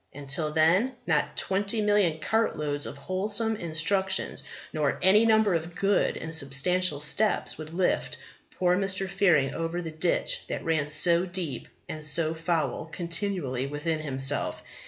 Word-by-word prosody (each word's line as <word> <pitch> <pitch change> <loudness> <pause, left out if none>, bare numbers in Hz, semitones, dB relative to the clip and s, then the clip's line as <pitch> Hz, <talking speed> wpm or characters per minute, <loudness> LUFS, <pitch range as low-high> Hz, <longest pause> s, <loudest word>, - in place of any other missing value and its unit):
And, 140 0 -10
till 150 +3 +2
then, 175 +12 +3
not - - 0
twenty 200 +3 0
million 205 -6 +2
cart 220 +7 0
loads 145 -1 -2
of - - -8
wholesome 205 +8 -1
instructions, 190 +2 0 0.3
nor 150 -3 0
any 210 +4 +5
number 220 -3 +4
of 170 +1 -3
good 200 +1 +1
and 160 0 -6
substantial 155 +3 +1
steps, 200 +8 +1
would 155 0 -8
lift 180 +2 -1 0.4
poor 180 -1 +3
Mr. 195 0 +1
Fearing 160 -8 +2
over 165 +1 -3
the 165 -2 -5
ditch 160 +2 0
that - - -5
ran 155 -3 0
so 170 +3 +2
deep 175 -7 -5 0.2
and 155 -1 -6
so 155 +2 +3
foul 165 -2 -2
continually 170 -6 -3
within 150 +3 -2
himself. 135 -2 -1
165 Hz, 150 wpm, -27 LUFS, 150-190 Hz, 0.4 s, any